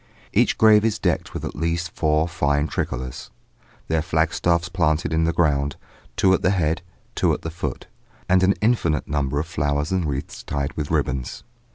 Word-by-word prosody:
Each - - +3
grave 105 -1 +6
is 110 -1 +1
decked - - -1
with - - -4
at - - -5
least 85 +3 -1
four 75 +1 +1
fine 75 -3 +1
tricolours, 65 -3 -4 0.6
their 80 0 +1
flagstaffs 85 +1 +1
planted 80 -4 0
in 80 0 +2
the 85 - +2
ground, 70 -4 +1 0.4
two 95 - +4
at - - +1
the - - +3
head, 85 -4 +1 0.3
two - - +2
at - - -10
the 80 - -4
foot, 90 +3 -5 0.4
and 95 0 +4
an 95 +1 +4
infinite 105 - +1
number 70 -1 -1
of 75 - -1
flowers 75 -2 -1
and 95 -3 +1
wreaths 70 -2 -4
tied 70 0 -3
with 75 -2 -3
ribbons. 65 -1 -2
80 Hz, 180 wpm, -23 LUFS, 75-90 Hz, 0.6 s, grave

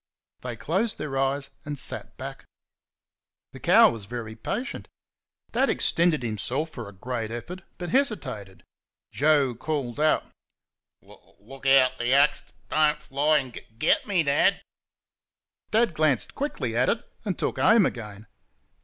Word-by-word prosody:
They 125 -2 -5
closed 185 - 0
their 145 -3 -4
eyes 135 +1 0
and 145 -1 -5
sat - - -4
back. - - -8 1.1
The - - -11
cow - - +6
was 110 -3 -7
very 115 0 -6
patient. 240 - -4 0.6
Dad - - +2
extended 165 -5 +2
himself 120 - -2
for 120 -7 -7
a - - -11
great 115 +3 -4
effort, 165 +11 -7 0.2
but 175 -1 -5
hesitated. 205 - -1 0.5
Joe 145 -3 +3
called 130 0 -3
out: 155 0 +3 0.8
"L - - -20
l 110 +7 -15
ook 135 0 -6
out 130 -1 +5
th' 120 +1 0
axe 140 +2 +4
dud - - -25 0.2
dud - - -1
don't 150 -1 +3
fly 150 +2 +2
and 130 -4 -3
gug - - -9
gug 110 - -31
get 155 - +2
me, 185 -5 +2
Dad!" 140 -1 +2 1.1
Dad 225 -4 +2
glanced 155 -6 +1
quickly 130 - -3
at 125 +2 +3
it, 230 - -1 0.2
and 200 -5 -2
took - - -2
aim 225 -3 +5
again. 105 -5 -5
135 Hz, 155 wpm, -26 LUFS, 120-155 Hz, 1.1 s, cow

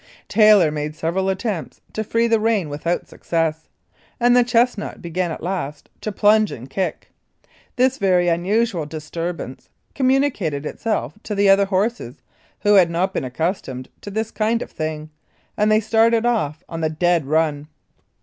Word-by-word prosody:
Taylor 210 -7 +5
made 150 0 -4
several 170 +4 -1
attempts 190 -3 -3
to 220 - -2
free 230 +2 +1
the 230 -1 +3
rein 215 -7 +1
without 155 +4 -2
success, 160 -1 -2 0.5
and 245 0 +4
the 245 - +6
chest 240 +1 +2
nut 210 - -6
began 175 +1 -2
at - - -6
last 165 -6 -4
to 215 - -3
plunge 210 +2 +3
and 125 +3 -9
kick. 190 +3 -3 0.6
This 260 +1 +2
very 180 -3 +3
un 170 0 +1
usual 200 -5 0
disturbance 155 -3 -6 0.2
communicated 255 - +1
itself 220 +6 -2
to 210 - -4
the 200 0 +3
other 195 +1 +5
horses, 195 - -2 0.4
who 205 0 +4
had 185 -4 +6
not 180 +3 0
been - - -2
accustomed 130 -2 -3
to - - -7
this 220 +2 -3
kind 230 +2 0
of - - -13
thing, 155 -1 -5 0.4
and 210 +1 +2
they 215 - +5
started 225 +1 +3
off 180 -9 0
on 165 -1 -6
the 160 - +1
dead 170 -1 +1
run. 150 -1 0
185 Hz, 165 wpm, -21 LUFS, 160-220 Hz, 0.6 s, the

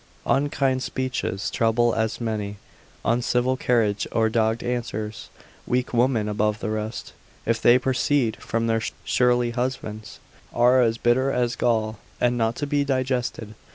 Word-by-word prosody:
Unkind 135 -2 +1
speeches 130 -7 -2
trouble 115 +1 +2
as 110 0 -1
many; 105 -3 -3 0.5
uncivil 125 +2 +1
carriage 115 -5 +1
or 110 -1 +2
dogged 110 0 +1
answers, 110 -3 -4 0.4
weak 125 0 0
women 120 -3 +2
above 105 0 0
the 110 - -3
rest, 110 +1 -4 0.3
if 115 0 0
they 120 +1 +6
proceed 130 -1 +1
from 115 0 -2
their 115 -1 +1 0.2
surly 125 -1 +2
husbands, 120 -3 -4 0.4
are 125 +2 +5
as 115 -1 +2
bitter 130 +4 +2
as 125 -1 0
gall, 110 -3 0 0.2
and 120 0 +2
not 115 -1 0
to 145 - -3
be 145 0 +1
digested. 130 -5 -2
120 Hz, 140 wpm, -24 LUFS, 110-125 Hz, 0.5 s, they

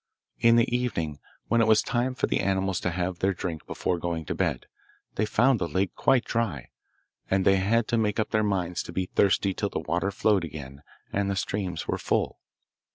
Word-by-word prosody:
In 115 0 +5
the 120 +1 +3
evening, 85 - -2 0.3
when 115 0 +3
it 115 - +3
was 110 -1 +5
time 125 +2 -1
for - - +1
the - - 0
animals 95 -1 0
to - - -1
have 90 0 -2
their 95 0 +1
drink 85 -4 -5
before 90 -2 -1
going 85 -2 -3
to - - -2
bed, - - -1 0.5
they 105 - 0
found 120 +3 +3
the 85 - -1
lake 95 +1 -1
quite 130 -3 +2
dry, 105 - -2 0.6
and 95 0 +2
they 95 0 +5
had 110 +4 +2
to 120 -2 +2
make 105 0 0
up 110 - -1
their 110 - +2
minds 95 -4 -1
to - - -8
be 95 - -1
thirsty 95 +1 +2
till 100 +1 -2
the - - -4
water 85 +5 -1
flowed 100 -1 +2
again 70 -3 -8 0.3
and 100 0 0
the 100 - 0
streams 95 -3 -3
were - - -1
full. - - -1
95 Hz, 210 wpm, -27 LUFS, 90-110 Hz, 0.6 s, In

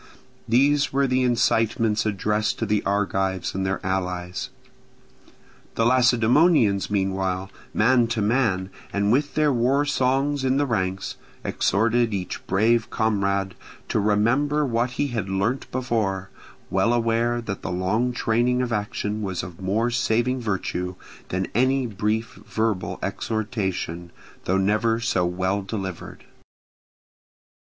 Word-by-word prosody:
These 140 +5 +3
were 140 +1 +2
the 130 0 +1
incitements 115 -3 +2
addressed 105 +1 0
to 115 - -1
the 105 -1 +1
Argives 95 -2 0
and 95 - -2
their 95 0 -1
allies. 90 +3 -2 1.3
The 115 - +2
Lacedaemonians 120 - +4
meanwhile, 95 -1 -1 0.2
man 120 +2 +3
to 115 0 -2
man, 105 -4 +1 0.2
and 100 +1 +1
with 145 +4 +1
their 150 -2 +3
war 130 +4 +2
songs 135 +1 +1
in 130 0 +2
the 145 - +2
ranks, 95 -6 -2 0.3
exhorted 115 +2 +1
each 90 -2 -5
brave 110 +3 +2
comrade 100 -3 0 0.4
to - - +1
remember 120 +9 +2
what 120 -1 0
he 145 - 0
had 110 -6 -3
learnt 100 +7 -1
before; 110 -7 -2 0.4
well 95 +5 +2
aware 120 0 +1
that 105 -4 -5
the - - -4
long 95 +8 0
training 120 +1 +1
of 120 -2 -2
action 105 0 -2
was 95 -4 -3
of 90 +1 -9
more 110 +6 0
saving 125 +1 +1
virtue 90 -4 -2 0.3
than 95 +1 -1
any 130 +3 +2
brief 110 +1 -2
verbal 110 -4 -1
exhortation, 95 -6 -3 0.4
though 95 - +2
never 110 +4 +2
so 95 -7 +1
well 95 +3 -1
delivered. 95 -3 -6
110 Hz, 130 wpm, -24 LUFS, 95-120 Hz, 1.3 s, Lacedaemonians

